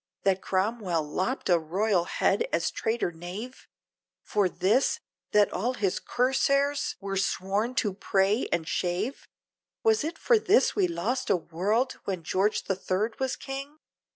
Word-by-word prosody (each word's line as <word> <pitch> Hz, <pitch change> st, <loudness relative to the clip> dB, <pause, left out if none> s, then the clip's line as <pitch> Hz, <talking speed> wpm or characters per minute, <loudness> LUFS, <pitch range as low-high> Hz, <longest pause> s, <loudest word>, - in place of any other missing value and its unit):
that 195 Hz, -1 st, +2 dB
Cromwell 190 Hz, -4 st, 0 dB
lopped 185 Hz, -, -2 dB
a 175 Hz, -2 st, +4 dB
royal 180 Hz, +3 st, +1 dB
head 465 Hz, -, +1 dB
as -, -, 0 dB
traitor 225 Hz, -5 st, -1 dB
knave? 180 Hz, +10 st, -8 dB, 0.6 s
For 205 Hz, -3 st, +1 dB
this! 210 Hz, +10 st, +2 dB, 0.3 s
that 210 Hz, -1 st, +4 dB
all 240 Hz, +7 st, -1 dB
his 195 Hz, -6 st, 0 dB
cuirassiers 275 Hz, +3 st, +1 dB
were 195 Hz, -1 st, -3 dB
sworn 200 Hz, +5 st, 0 dB
to 210 Hz, -6 st, +1 dB
pray 195 Hz, +3 st, +1 dB
and 160 Hz, -1 st, 0 dB
shave? 185 Hz, +12 st, -2 dB, 0.6 s
Was 440 Hz, -6 st, +3 dB
it 320 Hz, +3 st, -4 dB
for 470 Hz, -3 st, +3 dB
this 420 Hz, +3 st, +3 dB
we 390 Hz, -3 st, +3 dB
lost 260 Hz, -7 st, -2 dB
a -, -, +4 dB
world! 200 Hz, +10 st, -1 dB
when 185 Hz, -4 st, -3 dB
George 195 Hz, +6 st, +1 dB
the -, -, 0 dB
Third 195 Hz, +4 st, -2 dB
was 265 Hz, -1 st, 0 dB
king? 275 Hz, +2 st, -7 dB
210 Hz, 150 wpm, -28 LUFS, 185-260 Hz, 0.6 s, a